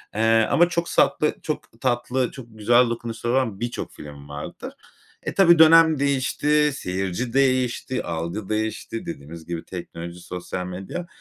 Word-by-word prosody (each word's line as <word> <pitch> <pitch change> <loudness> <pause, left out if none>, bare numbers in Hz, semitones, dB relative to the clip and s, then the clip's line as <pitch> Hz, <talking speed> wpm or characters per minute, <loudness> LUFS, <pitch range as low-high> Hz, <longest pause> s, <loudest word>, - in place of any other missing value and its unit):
Eee, 115 0 +3
ama 175 +1 +5
çok 170 -1 -1
satlı 150 - +2
çok 120 -6 -6
tatlı, 125 0 0
çok 130 -3 -10
güzel 115 +3 +3
dokunuşları 115 0 -3
olan 120 -7 0
birçok 120 0 -4
film 70 -1 -11
vardır. 75 0 -7 0.5
E, - - -3
tabii 170 -4 +6
dönem 160 -1 +7
değişti, 140 +2 +2
seyirci 95 +4 -3
değişti, 130 -1 +1
algı 85 +5 -4
değişti 110 +1 -3
dediğimiz 80 +1 -8
gibi, 85 0 -5
teknoloji, 85 -1 -7
sosyal 90 +1 -5
medya, 95 - -6
115 Hz, 140 wpm, -23 LUFS, 90-135 Hz, 0.5 s, dönem